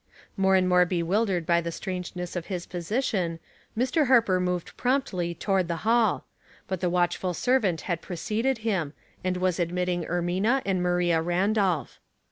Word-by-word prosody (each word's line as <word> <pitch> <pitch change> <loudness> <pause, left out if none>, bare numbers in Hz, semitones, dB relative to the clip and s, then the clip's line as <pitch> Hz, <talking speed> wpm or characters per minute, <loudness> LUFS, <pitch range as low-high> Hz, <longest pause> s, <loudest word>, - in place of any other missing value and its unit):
More 190 -1 +3
and 185 -1 +3
more 180 0 +5
bewildered 180 +1 0
by 170 +1 +3
the 170 0 -4
strangeness 180 0 -5
of 175 -2 -4
his 180 -3 -4
position, 180 -2 -1 0.4
^Ir. 260 +5 +2
Harper 225 -8 +4
moved 180 -1 -2
promptly 205 -10 0
to 195 - -4
ward 190 -2 +2
the 170 - -1
hall; 225 -2 +3 0.4
but 190 -2 -2
the 180 - +1
watchful 175 0 0
servant 220 -9 +1
had 170 -3 -3
pre 180 - -6
ceded 225 +8 0
him, 175 -10 0 0.3
and 185 0 0
was 185 -1 0
admitting 175 0 -1
Ermina 185 +9 0
and 190 -2 0
Maria 175 -2 +2
Randolph. 180 - 0
180 Hz, 160 wpm, -26 LUFS, 175-205 Hz, 0.4 s, more